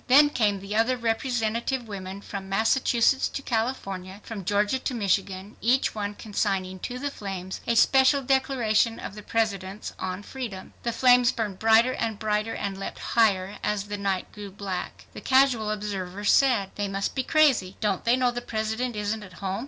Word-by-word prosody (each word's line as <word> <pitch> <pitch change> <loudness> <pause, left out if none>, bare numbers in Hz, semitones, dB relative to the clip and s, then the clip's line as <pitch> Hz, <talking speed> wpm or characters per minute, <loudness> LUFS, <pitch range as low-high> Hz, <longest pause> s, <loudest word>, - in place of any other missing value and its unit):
Then 290 +3 +7
came 205 -6 +1
the 200 +2 -5
other 235 +3 +2
representative 235 +1 -1
women, 195 -1 -7
from 195 -1 -7
Massachusetts 235 +5 +2
to 275 - -6
California, 200 -6 -3
from 215 -4 -7
Georgia 205 +6 +1
to 255 - -3
Michigan, 195 -1 -1
each 250 +4 +2
one 205 -1 -4
consigning 195 -3 -2
to 245 +6 -5
the 285 +2 -3
flames 190 -5 -6
a 235 - +2
special 265 +4 +5
declaration 245 -4 +2
of - - -6
the 210 - -9
President's 205 -3 -2
on 185 +1 -4
freedom. 220 -7 -7
The 235 - -1
flames 245 +1 +5
burned 210 -5 -4
brighter 225 +3 +5
and 220 -2 -2
brighter 215 +1 -1
and 195 -1 -4
leapt 195 - -5 0.2
higher 200 -4 +2
as 205 -1 -1
the 205 - -3
night 195 -2 -2
grew 205 -1 -8
black. 190 -1 -6
The - - -8
casual 260 -5 +3
observer 205 -2 -4
said, 230 -4 +3
"They 205 0 -1
must 195 0 -2
be 265 - 0
crazy. 260 - +3
Don't 205 -4 0
they 235 +1 +4
know 250 -1 +2
the 245 0 -4
President 220 +1 -2
isn't 210 +1 -2
at 190 -4 -11
home? 190 +3 -3
215 Hz, 175 wpm, -26 LUFS, 195-245 Hz, 0.2 s, Then